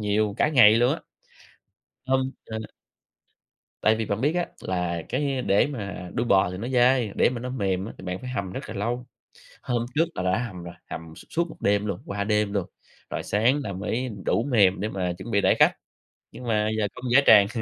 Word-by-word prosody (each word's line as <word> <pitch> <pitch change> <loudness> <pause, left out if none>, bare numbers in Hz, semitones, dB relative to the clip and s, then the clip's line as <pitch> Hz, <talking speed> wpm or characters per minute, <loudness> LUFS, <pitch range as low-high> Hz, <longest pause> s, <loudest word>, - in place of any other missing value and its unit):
nhiều, 105 0 +1
cả - - +3
ngày 125 -8 +7
luôn 120 +2 +3
á. - - -8 1.1
Hông, 130 0 +1
ừ. 110 - -5 1.2
Tại 110 - +4
vì 110 0 -2
bạn 100 +1 -2
biết 145 +4 +2
á 175 -1 +1 0.2
là 90 -2 -2
cái 135 -1 -1
để 100 0 +3
mà 100 -9 -6
đuôi 120 - -1
bò 95 -4 +3
thì 90 - -6
nó 110 +5 -4
dai, 125 -3 +3
để - - +4
mà 125 -1 -5
nó 125 - -4
mềm 95 -7 -1
á 110 - -7
thì - - -11
bạn 90 0 -4
phải 125 - -6
hầm 100 -7 -3
rất 95 - -7
là - - -5
lâu. 120 +5 -2 0.6
Hôm 120 -2 -1
trước 160 +3 +4
là - - -2
đã 95 +2 +2
hầm 90 -5 -9
rồi, 85 0 -8 0.2
hầm 80 -1 -7
s - - -12
suốt 170 +1 0
1 - - -11
đêm 100 +1 +2
luôn, 100 -3 -3
qua 100 0 -3
đêm 105 -1 +1
luôn, 100 -4 0 0.4
rồi - - -4
sáng 115 +8 +2
là 100 - -4
mới 115 +7 -2 0.2
đủ 115 - +2
mềm 100 -5 +4
để 105 +3 -2
mà 90 -3 -2
chuẩn 115 +5 -8
bị 100 - +3
đãi - - +4
khách, - - +6 0.6
nhưng - - -10
mà 105 -2 +1
giờ 105 -1 +1
công 130 - -8
dã 135 +4 +7
tràng. 105 -2 +8
105 Hz, 225 wpm, -25 LUFS, 100-125 Hz, 1.2 s, tràng